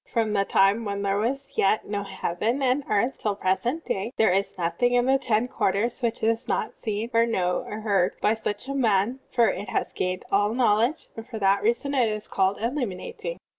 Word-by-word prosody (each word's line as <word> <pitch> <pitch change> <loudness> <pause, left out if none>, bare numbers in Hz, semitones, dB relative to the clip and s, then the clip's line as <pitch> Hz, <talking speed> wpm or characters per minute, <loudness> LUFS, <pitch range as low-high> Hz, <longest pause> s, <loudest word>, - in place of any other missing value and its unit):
From 225 -3 0
the 200 -1 +2
time 195 +4 +3
when 200 -1 -3
there 200 0 +1
was 270 +5 -2
yet 195 +2 +3
no 205 0 -2
heaven 205 +6 -2
and 260 +2 +2
earth 225 +6 +1
till 210 -2 -1
the - - -25
present 240 - 0
day, 195 +4 -2
there 220 - +4
is 195 +1 0
nothing 215 +8 +1
in 245 0 +3
the 270 +1 +3
ten 230 -1 +1
quarters 225 +1 -1
which 230 -2 -2
is 225 +2 +1
not - - -1
seen, 220 +2 -4
or 230 0 +4
known, 180 -5 -1
or 210 +1 -5
heard 195 -4 +1
by 215 - +3
such 220 +1 -4
a 275 - -3
mind, 230 -1 +1
for 235 -3 +3
it 200 - -4
has - - -2
gained 185 0 -2
all 205 +3 +2
knowledge, 240 +4 +2
and 225 0 -8
for 225 - -6
that 200 -1 +2
reason 240 +6 0
it 250 -5 +3
is 215 0 -3
called 195 +1 +1
*illiuninating.'" 250 - -4
220 Hz, 210 wpm, -25 LUFS, 200-245 Hz, -, there